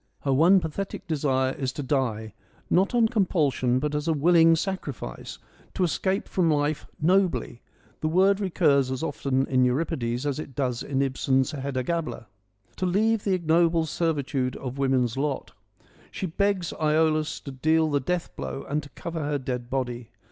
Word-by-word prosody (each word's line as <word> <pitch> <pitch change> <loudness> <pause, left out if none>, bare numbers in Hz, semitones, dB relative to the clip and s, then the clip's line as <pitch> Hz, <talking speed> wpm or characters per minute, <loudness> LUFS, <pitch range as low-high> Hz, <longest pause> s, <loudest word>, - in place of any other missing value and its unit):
Her 135 - +1
one 170 +8 +6
pathetic 190 +4 -5
desire 135 -5 0
is 130 -2 -3
to 145 - -5
die, 115 -6 -1 0.4
not 195 +6 +3
on 230 -2 +5
compulsion 155 - +1
but 150 +3 -1
as 150 +2 -2
a 165 - +3
willing 165 +2 +5
sacrifice, 175 -6 -5 0.2
— - - -28
to 185 - +1
escape 190 +3 0
from 175 -3 +1
life 150 0 0
nobly 170 -8 +1 0.4
(the 155 - -1
word 190 +4 +3
recurs 155 -9 +2
as 130 +3 -3
often 135 -3 0
in 130 -1 +2
Euripides 125 -2 -1
as 145 0 -1
it 140 -4 -8
does 125 -4 -1
in 140 -1 0
Ibsen's 135 0 +1
Hedda 135 -3 -3
Gabler), 165 -5 -3 0.5
to 185 - 0
leave 215 +4 +1
the 195 -2 +2
ignoble 165 -1 +2
servitude 145 -5 -1
of 130 +1 -6
woman's 130 -3 +1
lot. 140 0 -2 0.6
She - - -4
begs 190 0 0
Iolaus 155 0 +2
to 140 - -6
deal 155 +4 +2
the 145 - +2
death 175 +6 -3
blow 135 - -5
and 150 +2 -1
to 145 - -13
cover 170 -1 -5
her 145 0 0
dead 125 -2 -4
body. 125 -3 -3
150 Hz, 170 wpm, -26 LUFS, 130-170 Hz, 0.6 s, one